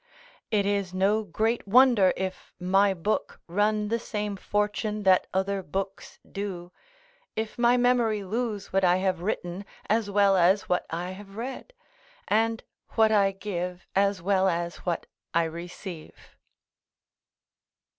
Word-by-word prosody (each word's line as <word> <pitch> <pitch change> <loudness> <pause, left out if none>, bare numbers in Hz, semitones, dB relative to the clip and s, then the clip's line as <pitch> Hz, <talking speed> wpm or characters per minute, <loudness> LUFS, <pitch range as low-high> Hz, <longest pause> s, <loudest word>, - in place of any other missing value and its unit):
It 205 -3 +2
is 200 -2 -1
no 205 +4 +2
great 220 +2 -1
wonder 235 -4 +6
if 190 0 -5
my 195 +2 +3
book 195 +5 -2
run 210 +3 +1
the 230 +1 0
same 210 -3 -3
fortune 210 +2 -1
that 190 -1 +4
other 190 +1 0
books 195 +3 -5
do, 185 -3 -5 0.6
if 220 0 -3
my 240 +1 +5
memory 240 -4 +2
lose 210 0 -3
what 195 0 +2
I 180 -1 +5
have 185 -2 0
written 180 -1 -3 0.2
as 220 -1 +1
well 200 -1 +4
as 190 +2 +4
what 180 - -1
I 175 +2 -3
have 195 +1 -11
read, 260 - -6 0.6
and 225 +1 +1 0.3
what 220 -1 +4
I 200 -2 +4
give, 180 -2 -5
as 195 -2 +2
well 190 0 +3
as 170 0 -2
what 175 -2 -3 0.3
I 170 - +4
receive. 170 +1 -7
200 Hz, 135 wpm, -27 LUFS, 185-215 Hz, 0.6 s, wonder